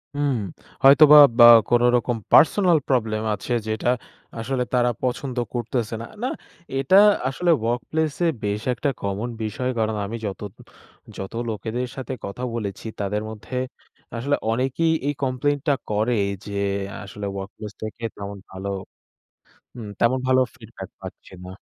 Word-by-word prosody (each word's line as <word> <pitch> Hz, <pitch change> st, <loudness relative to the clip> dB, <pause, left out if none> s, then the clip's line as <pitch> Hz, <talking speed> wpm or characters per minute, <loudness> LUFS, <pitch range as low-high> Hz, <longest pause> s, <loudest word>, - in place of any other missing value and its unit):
হুম, 145 Hz, -2 st, +1 dB, 0.5 s
হয়তোবা 150 Hz, +2 st, +9 dB, 0.5 s
কোনোরকম 120 Hz, 0 st, +3 dB, 0.2 s
personal 175 Hz, +1 st, +5 dB
problem 110 Hz, -4 st, 0 dB
আছে 105 Hz, +4 st, -4 dB
যেটা 110 Hz, +2 st, -1 dB, 0.5 s
আসলে 125 Hz, +2 st, -1 dB
তারা 125 Hz, -1 st, +3 dB
পছন্দ 125 Hz, 0 st, -3 dB, 0.2 s
করতেছে 120 Hz, -2 st, -2 dB
না। 115 Hz, -, -6 dB, 0.2 s
না, -, -, +1 dB, 0.5 s
এটা 135 Hz, +8 st, +2 dB, 0.3 s
আসলে 170 Hz, +6 st, +1 dB
ওয়ার্কপ্লেসে 150 Hz, +8 st, -1 dB, 0.2 s
বেশ 105 Hz, 0 st, -1 dB
একটা 140 Hz, +3 st, -1 dB
কমন 100 Hz, +4 st, -3 dB
বিষয়। 110 Hz, +4 st, -3 dB
কারণ 110 Hz, -1 st, 0 dB
আমি 110 Hz, +4 st, -5 dB
যত, 100 Hz, -2 st, -5 dB, 0.8 s
যত 95 Hz, -, -6 dB, 0.2 s
লোকেদের 115 Hz, +3 st, -3 dB
সাথে 130 Hz, -1 st, -5 dB
কথা 100 Hz, +6 st, -6 dB
বলেছি 105 Hz, -2 st, -5 dB
তাদের 105 Hz, +1 st, -1 dB
মধ্যে 110 Hz, +4 st, -8 dB, 0.6 s
আসলে 140 Hz, +5 st, 0 dB, 0.2 s
অনেকেই 135 Hz, +7 st, +1 dB
এই 145 Hz, -, +1 dB
কমপ্লেইন 135 Hz, +2 st, 0 dB
টা 145 Hz, -, +5 dB, 0.2 s
করে 110 Hz, +3 st, +1 dB, 0.3 s
যে 105 Hz, -, -7 dB, 0.5 s
আসলে 100 Hz, +1 st, -7 dB
ওয়ার্কপ্লেস 100 Hz, +2 st, -7 dB
থেকে 110 Hz, +2 st, -7 dB
তেমন 100 Hz, 0 st, -7 dB
ভালো। 95 Hz, +1 st, -6 dB, 1.1 s
হুম, 115 Hz, -4 st, -8 dB
তেমন 125 Hz, +3 st, +3 dB
ভালো 130 Hz, 0 st, +4 dB
ফিডব্যাক 110 Hz, -5 st, -11 dB
পাচ্ছে -, -, -11 dB
না। 90 Hz, -, -8 dB
120 Hz, 135 wpm, -23 LUFS, 105-135 Hz, 1.1 s, হয়তোবা